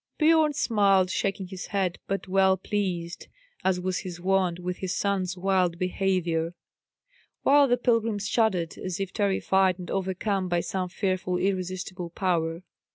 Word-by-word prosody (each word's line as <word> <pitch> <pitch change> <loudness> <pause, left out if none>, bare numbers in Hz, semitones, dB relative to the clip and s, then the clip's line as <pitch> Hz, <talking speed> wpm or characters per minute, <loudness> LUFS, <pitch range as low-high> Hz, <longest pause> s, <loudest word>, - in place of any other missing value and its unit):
Biorn 315 -1 +4
smiled, 200 -8 +3
shaking 195 -2 -2
his 185 -1 -7
head, 190 -4 -1
but 195 0 -3
well 190 0 +3
pleased, 185 -4 -3 0.4
as 190 -1 +2
was 185 0 -1
his 175 -2 -7
wont, 185 -1 +1
with 180 0 -4
his 185 -1 -3
son's 190 -2 -1
wild 180 -2 +1
behaviour; 175 -2 0 0.9
while 285 0 +6
the 245 -1 +3
pilgrim 230 -3 +1
shuddered 205 -5 0
as 185 -1 -4
if 195 -1 -3
terrified 190 -2 +2
and 180 -2 -7
overcome 190 0 -1
by 175 -1 +1
some 185 0 -3
fearful 185 -1 -1
irresistible 185 -1 -2
power. 170 -1 -1
190 Hz, 145 wpm, -27 LUFS, 180-195 Hz, 0.9 s, while